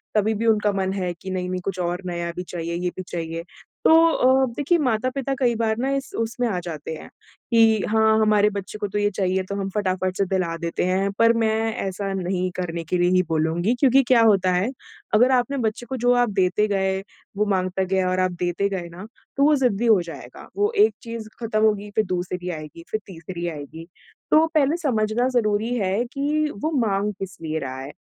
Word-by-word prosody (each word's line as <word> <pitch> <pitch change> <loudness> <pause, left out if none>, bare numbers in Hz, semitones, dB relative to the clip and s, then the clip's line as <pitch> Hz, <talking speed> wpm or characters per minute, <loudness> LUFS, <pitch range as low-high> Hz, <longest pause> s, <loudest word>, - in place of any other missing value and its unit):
तभी 215 +1 +2
भी 225 +2 -2
उनका 210 -2 +3
मन 190 0 -1
है 180 -3 -2
कि 190 - -7
नहीं-नहीं 180 0 -3
कुछ 190 -2 -3
और 175 +1 -2
नया 170 -1 -3
भी 180 - -4
चाहिए, 170 -1 -5
ये 180 +1 -1
भी - - -3
चाहिए। 165 -1 -4 0.4
तो - - +7 0.2
अ, 260 -1 +4
देखिए 310 +4 +2
माता-पिता 255 +3 -1
कई 240 -3 +2
बार 220 -1 0
ना 265 +2 0
इस 275 - -4
उसमें 235 +2 -1
आ 185 -5 -1
जाते 160 -2 -6
हैं, - - -11 0.4
कि 225 -2 +4
हाँ, 220 0 +4
हमारे 210 -1 +4
बच्चे 200 0 -6
को 205 -1 -2
तो 200 - -4
ये 205 0 +2
चाहिए 190 -1 0
तो 200 - -3
हम 195 -1 -3
फटाफट 185 -2 -1
से 195 - +2
दिला 180 -3 -1
देते 170 0 -2
हैं, 190 +2 +1
पर 230 0 +6
मैं 225 -1 0
ऐसा 195 -2 -3
नहीं 185 -1 -1
करने 170 -1 -3
की 170 +3 -1
लिए 175 0 +3
ही 185 0 +4
बोलूँगी 165 +7 +1
क्योंकि 270 -1 +5
क्या 245 -3 +5
होता 195 -4 +4
है, 185 +6 +1 0.4
अगर 245 +5 +5
आपने 255 +2 +1
बच्चे 220 +3 -4
को 265 - -3
जो 245 +1 +2
आप 240 - 0
देते 190 +3 +2
गए, 190 -2 0 0.4
वो 210 - +2
माँगता 190 -1 0
गया 185 0 0
और 185 - 0
आप 185 0 +2
देते 180 +3 0
गए 180 -3 -4
ना, 180 +4 -10 0.3
तो 280 - +3
वो 300 +1 +5
ज़िद्दी 240 -4 +1
हो 220 -5 +5
जाएगा। 170 -1 -10
वो 415 +1 +2
एक - - -2
चीज़ 230 -2 -7
ख़त्म 225 -2 -1
होगी, 210 -1 +1
फिर 215 - +2
दूसरी 180 0 -3
आएगी, 155 0 -7
फिर 215 - 0
तीसरी 175 -1 -6
आएगी, 160 +1 -7 0.4
तो 315 +1 +6
पहले 300 +2 +3
समझना 240 -6 0
ज़रूरी 215 +2 0
है 200 +2 0
कि 300 +2 0
वो 315 - 0 0.2
माँग 200 +1 0
किस 195 -1 -6
लिए 160 -1 -2
रहा 130 -2 -5
है। 135 +2 -7
200 Hz, 210 wpm, -23 LUFS, 180-230 Hz, 0.4 s, तो